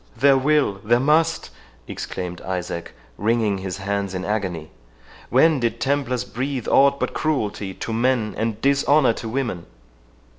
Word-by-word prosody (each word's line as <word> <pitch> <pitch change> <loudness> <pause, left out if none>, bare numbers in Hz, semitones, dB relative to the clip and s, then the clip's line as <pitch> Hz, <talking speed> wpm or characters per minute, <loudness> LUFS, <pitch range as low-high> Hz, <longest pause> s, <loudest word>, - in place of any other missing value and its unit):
"There 135 +3 +5
will, 135 -7 +1
there 120 +3 +3
must!" 155 - +2 0.4
exclaimed 90 -1 -6
Isaac, 90 -2 -4 0.3
wringing 110 -2 +1
his 95 -1 -5
hands 100 0 -2
in 95 0 -3
agony; 95 -7 -3 0.6
"when 150 +4 +4
did 120 -2 -1
Templars 135 -3 0
breathe 130 0 -4
aught 140 0 +4
but - - -2
cruelty 105 -10 -2
to 115 - -5
men, 115 -2 +1
and 110 -1 -2
dishonour 140 -1 +3
to 110 - -6
women!" 120 - -3
115 Hz, 140 wpm, -22 LUFS, 100-135 Hz, 0.6 s, There